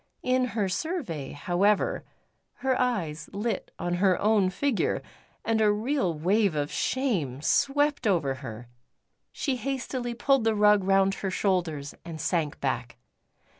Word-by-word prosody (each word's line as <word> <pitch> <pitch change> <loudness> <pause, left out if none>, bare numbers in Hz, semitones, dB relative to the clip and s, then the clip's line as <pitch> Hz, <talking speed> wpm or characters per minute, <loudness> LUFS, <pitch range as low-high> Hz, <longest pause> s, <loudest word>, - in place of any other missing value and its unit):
In 255 0 +2
her 205 -3 +2
survey, 185 - -3
however, 185 +7 +1 0.6
her 260 -1 +3
eyes 165 -12 -1
lit 210 0 -2
on 175 - -2
her 190 -3 +4
own 210 -3 +3
figure, 265 +5 0 0.4
and 225 -1 +1
a 210 -1 +5
real 220 -1 0
wave 190 +3 +2
of 145 0 -1
shame 185 - -1
swept 285 - +2
over 165 -9 +2
her; 120 -2 -8 0.6
she 270 -3 -2
hastily 255 -1 -3
pulled 270 0 +2
the 225 -1 +2
rug 210 -1 +5
round 195 0 +3
her 195 - -3
shoulders 175 -7 -1
and 165 -2 -7
sank 155 -2 -1
back. 125 -3 -2
200 Hz, 135 wpm, -27 LUFS, 165-245 Hz, 0.6 s, a